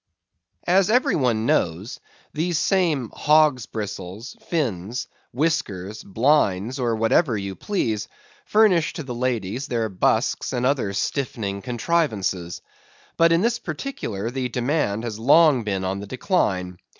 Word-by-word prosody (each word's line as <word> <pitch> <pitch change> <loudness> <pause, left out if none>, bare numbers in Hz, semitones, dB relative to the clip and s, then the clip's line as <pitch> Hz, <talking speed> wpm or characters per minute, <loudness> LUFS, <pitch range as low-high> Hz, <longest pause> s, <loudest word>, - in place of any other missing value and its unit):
As 190 +2 +3
every 250 +4 +3
one 120 -6 +1
knows, 90 +3 0 0.3
these 165 +2 -1
same 160 - +1
"hogs' 150 -6 +3
bristles," 105 - -6
"fins," 120 - -2 0.2
"whiskers," 110 - -2
"blinds," 115 0 +1
or 120 -2 0
whatever 115 +3 +2
you 100 -1 -4
please, 110 - -2 0.4
furnish 205 -7 +3
to 160 - -5
the 130 -3 -6
ladies 120 0 -2
their 115 -2 -1
busks 90 - 0
and 125 0 0
other 130 -7 +1
stiffening 100 -3 -2
contrivances. 110 - -1 0.5
But 165 0 +4
in 165 +1 +4
this 235 +2 +1
particular, 145 - -4
the 130 -1 -2
demand 120 -3 -1
has 110 -3 -5
long 145 +1 +5
been 95 -3 -2
on 95 +1 -2
the 100 - -7
decline. 95 - -1
120 Hz, 130 wpm, -23 LUFS, 100-155 Hz, 0.5 s, long